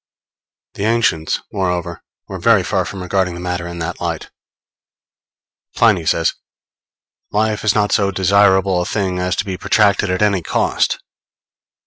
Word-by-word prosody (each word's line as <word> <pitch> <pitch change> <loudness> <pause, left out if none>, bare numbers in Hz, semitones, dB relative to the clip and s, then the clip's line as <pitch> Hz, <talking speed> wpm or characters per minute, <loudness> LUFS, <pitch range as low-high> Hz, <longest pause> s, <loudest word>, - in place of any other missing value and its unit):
The 100 - -3
ancients, 110 -9 +1
moreover, 90 -3 -2 0.3
were - - -6
very - - +4
far - - -1
from 95 -2 -6
regarding 90 -1 -1
the - - -7
matter 90 -1 -3
in 85 0 -7
that 80 -1 -5
light. - - -4 1.4
Pliny 100 -8 +3
says: 80 -1 +2 1.0
_Life 110 0 0
is 105 -2 +2
not 105 -1 +1
so 100 -1 +2
desirable 95 -1 +3
a - - -2
thing 95 -3 -2
as 90 0 -1
to 100 - -2
be 95 -2 -5
protracted 105 -1 +2
at 95 +2 0
any 100 -3 +2
cost. - - 0
95 Hz, 145 wpm, -18 LUFS, 90-100 Hz, 1.4 s, very